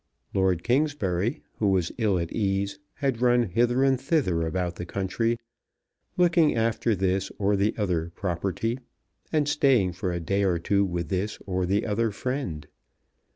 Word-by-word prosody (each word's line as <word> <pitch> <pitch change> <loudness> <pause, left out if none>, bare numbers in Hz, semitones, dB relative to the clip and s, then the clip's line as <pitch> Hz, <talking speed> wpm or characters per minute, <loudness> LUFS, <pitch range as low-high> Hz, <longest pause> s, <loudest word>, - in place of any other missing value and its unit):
Lord 95 -3 +1
Kingsbury, 120 - 0 0.2
who 105 - +2
was 95 -3 +1
ill 105 -5 +2
at 85 -1 -3
ease, 100 -1 -1 0.2
had 135 -5 -1
run 120 -1 +4
hither 120 +6 +2
and 135 -2 +2
thither 130 - +1
about 90 +1 -2
the - - -4
country, 115 +6 -1 0.8
looking 170 -4 +4
after 115 0 +1
this 95 0 0
or 100 0 +2
the 100 +3 +1
other 90 -6 0
property, 100 +6 -2 0.5
and 150 -2 +2
staying 135 - +3
for 90 +1 -2
a 85 - -2
day 100 +4 0
or 90 -3 +2
two 100 +4 +1
with 85 -3 -2
this 100 +3 -1
or 95 -2 -1
the 100 +3 +1
other 115 +1 +1
friend. 100 - -3
100 Hz, 155 wpm, -26 LUFS, 90-120 Hz, 0.8 s, run